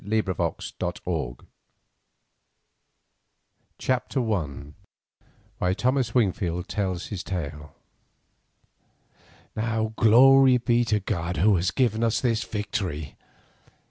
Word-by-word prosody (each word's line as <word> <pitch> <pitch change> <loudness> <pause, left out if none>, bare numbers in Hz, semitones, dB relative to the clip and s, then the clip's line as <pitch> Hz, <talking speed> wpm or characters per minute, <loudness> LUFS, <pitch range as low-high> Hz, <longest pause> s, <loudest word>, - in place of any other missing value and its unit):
Montezuma's 100 -3 -2
Daughter - - -4 2.3
CHAPTER 125 -2 -1
I 75 -5 -4 0.9
WHY 90 0 +1
THOMAS 130 -1 0
WINGFIELD 90 -6 0
TELLS 95 -4 -2
HIS 100 -4 -4
TALE 75 -5 -5 1.8
Now 110 0 -1
glory 130 +3 +6
be 120 0 +2
to 105 -2 +1
God 90 -3 -3
who 105 +2 +4
has 90 +1 +1
given 115 -1 0
us 115 -1 +2
the 120 -3 +1
victory! 100 - -4
105 Hz, 90 wpm, -25 LUFS, 90-115 Hz, 2.3 s, glory